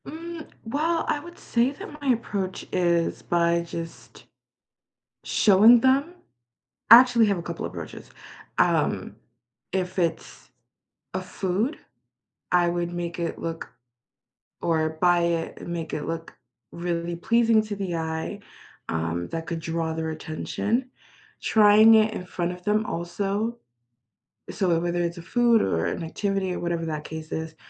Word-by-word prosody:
Mm, 330 +1 -7 0.2
well, 320 +8 0
I 295 - 0
would 345 +3 -12
say 240 +3 +1
that 295 +1 -10
my 280 - -1
approach 200 -5 -4
is 170 -2 +1
by 170 0 +2
just 165 -1 -9 1.0
showing 220 +4 +6
them. 275 +7 +2 0.8
I 230 - +13
actually 245 -3 +4
have 200 -2 +1
a - - -4
couple - - -5
of - - -5
approaches. - - -9 0.5
Um, - - +1 0.6
if 185 0 -2
it's 165 -2 -3 0.6
a - - -2
food, 200 - -2 0.8
I 175 -1 +4
would 175 0 -2
make 175 0 -4
it 170 -1 -3
look 165 0 -5 0.9
or 160 -1 +1
buy 175 -1 +5
it 170 -1 -1
and - - -8
make 170 -2 -4
it 150 - -3
look 165 0 -5 0.4
really 170 0 -3
pleasing 230 +4 +3
to 215 -1 -5
the 190 -4 -3
eye, 160 +4 -3 0.5
um, 80 +1 -2
that 165 0 -4
could 165 -1 -3
draw 160 0 -2
their 160 0 -3
attention. 205 +10 -2 0.5
Trying 215 +1 +6
it 220 0 +4
in 180 - -6
front 175 -1 -2
of 180 0 -10
them 210 +2 +1
also. 200 +7 -2 0.9
So, 190 -4 -1
wh 165 -1 +2
whether 175 0 0
it's 170 +1 -3
a - - -7
food 235 +5 +3
or 80 -4 0
an - - -3
activity 195 +2 -2
or - - -4
whatever 170 -1 -2
that 155 -2 -4
case 160 0 -7
is, 160 0 -4
175 Hz, 150 wpm, -25 LUFS, 165-220 Hz, 1.0 s, I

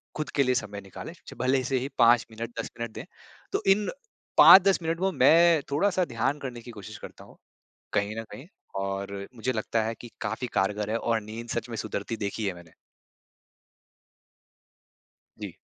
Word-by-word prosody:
खुद 155 - -3
के 140 - +4
लिए 130 0 +1
समय 105 -3 -3
निकालें। 95 - -9
च - - -8
भले 130 +1 +2
से 130 +1 0
ही 135 +3 -4
5 120 -1 +5
मिनट 115 +1 -6
10 - - -3
मिनट 115 -1 -4
दें। - - -7 0.5
तो - - -1
इन 205 +1 +2 0.5
5-10 190 0 +9
मिनट 165 +1 -1
वो 190 0 +2
मैं 170 -2 +5
थोड़ा-सा 185 +4 +2
ध्यान 135 +4 -1
करने 125 -4 -6
की 120 - -10
कोशिश 105 -4 -9
करता - - -11
हूँ, - - -18 0.6
कहीं 100 +2 0
न - - -8
कहीं 135 - -10 0.4
और 100 0 -4
मुझे 125 +3 -1
लगता 110 0 -1
है 115 +1 -2
कि 120 - -10
काफ़ी 110 +4 -3
कारगर 105 +2 0
है 115 - +1
और 115 -1 0
नींद 115 +3 -8
सच 120 +1 -3
में 115 - -4
सुधरती 110 +1 -4
देखी 105 +1 -3
है 95 - -1
मैंने। 85 -2 -14 2.7
जी। - - -7
115 Hz, 180 wpm, -27 LUFS, 105-135 Hz, 2.7 s, 5-10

